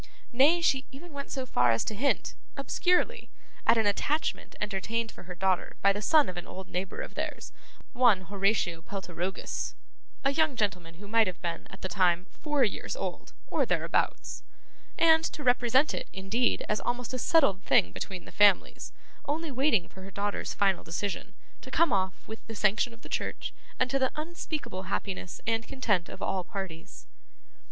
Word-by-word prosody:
Nay, 295 +8 +5
she 270 -5 +2
even 305 +5 -11
went 280 0 -6
so 265 -2 -3
far 125 - +3
as 115 -1 +2
to - - -2
hint, 260 +7 0 0.2
obscurely, 360 +11 +1 0.4
at - - +6
an 220 - +3
attachment 285 +10 0
entertained 215 +3 -2
for - - -13
her 180 0 -7
daughter 190 0 0
by 200 0 +6
the 205 - -4
son 300 +6 +5
of 180 - -5
an 175 - -5
old 190 0 -8
neighbour 180 +1 -3
of - - -7
theirs, - - -4 0.4
one 240 -7 +5
Horatio 195 -3 0
Peltirogus 185 -1 -4 0.5
(a 275 - +3
young 315 -2 +2
gentleman 180 -7 -1
who 205 +4 -11
might 225 0 +4
have 180 -3 -4
been, 170 -1 -3
at - - -12
that 190 - -4
time, 180 -2 +3
four 295 -3 0
years 225 - -1
old, - - -5
or - - +1
thereabouts), - - 0 0.6
and 320 0 +6
to 300 - -3
represent 250 +2 +4
it, - - -4
indeed, 200 +6 0
as 210 - 0
almost 245 +1 -2
a 255 - -2
settled 225 - +4
thing 85 - +4
between 185 - -6
the - - -11
families 205 -2 +3 0.3
only 310 +2 -2
waiting 260 - +2
for 190 - -13
her 190 - -8
daughter's 205 +1 -2
final 195 -2 +2
decision, 200 +3 -4 0.3
to - - -10
come 320 +1 +3
off 190 -1 -1
with 220 +1 -8
the 225 - -6
sanction 210 +3 +2
of 230 0 -16
the - - -9
church, - - -3 0.3
and 255 - +3
to 275 - +2
the 260 -1 +2
unspeakable 305 - -5
happiness 185 -2 -3
and 225 +1 0
content 205 -10 0
of - - -8
all 185 -1 0
parties. 175 -3 -7
210 Hz, 180 wpm, -29 LUFS, 190-270 Hz, 0.6 s, at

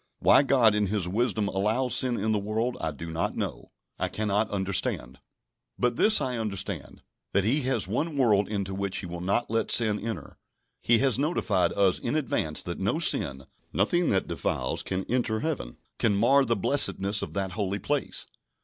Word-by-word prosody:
Why - - +5
God 130 -6 +4
in 105 -1 +1
His 100 -2 -1
wisdom 105 +1 0
allows 110 +7 0
sin 125 -2 +3
in 110 +2 -1
the 105 - +1
world, 110 +4 -2
I 80 - -1
do 80 +3 -8
not 80 +1 -2
know, - - -5 0.3
I - - 0
cannot 105 0 -1
understand. 100 -2 -1 0.6
But 125 -1 0
this 215 - +5
I 125 -3 -2
understand: 100 -7 -4 0.3
that 100 - +3
He 130 +9 +1
has 115 -9 +1
one 145 - -2
world 105 -7 +2
into 100 -2 -3
which 100 0 -2
He - - -4
will 85 0 -7
not 100 +6 -1
let 115 0 0
sin 110 -3 +3
enter. 115 0 -6 0.4
He 120 - +4
has 130 -1 +3
notified 110 - +1
us 95 -2 +2
in 120 - -2
advance 80 - 0
that - - -6
no - - 0
sin, 65 -1 +3 0.3
nothing 170 - +1
that 95 - 0
defiles, 85 -5 -2
can 95 +1 -3
enter 115 -3 -1
Heaven, 150 - -4 0.2
can 105 -3 +2
mar 135 +7 +4
the 115 -1 +1
blessedness 100 -3 +2
of - - -6
that 95 -1 -2
holy 100 0 -2
place. 145 +6 -2
105 Hz, 185 wpm, -27 LUFS, 95-120 Hz, 0.6 s, Why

